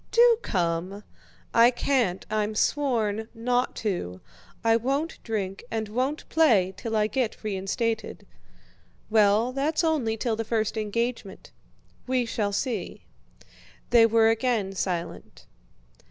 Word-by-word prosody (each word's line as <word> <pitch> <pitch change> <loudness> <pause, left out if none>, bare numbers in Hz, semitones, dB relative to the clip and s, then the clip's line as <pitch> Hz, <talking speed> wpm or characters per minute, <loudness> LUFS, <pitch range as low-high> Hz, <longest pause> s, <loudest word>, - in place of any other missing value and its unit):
"Do 470 -1 +5
come." 180 - -2 0.5
"I 230 +1 +7
can't. 240 -7 0
I've 215 0 -1
sworn 225 -7 0
not 245 +2 0
to. 95 - -2 0.4
I 225 0 +4
won't 275 +7 -1
drink 195 -4 -4
and 220 -1 -3
won't 260 +7 -2
play 215 - +3
till 225 +3 -4
I 210 -1 +3
get 225 +1 -2
reinstated." 215 +3 -3 0.9
"Well, 215 +2 +4
that's 285 +6 0
only 275 -9 0
till 225 0 -1
the 225 - -3
first 220 -1 -1
engagement." 220 -1 -3 0.6
"We 255 -1 +1
shall 215 -3 -2
see." 230 +4 -3 0.9
They 230 -1 +7
were 225 0 +4
again 225 -4 0
silent. 175 -3 -4
225 Hz, 120 wpm, -26 LUFS, 205-250 Hz, 0.9 s, I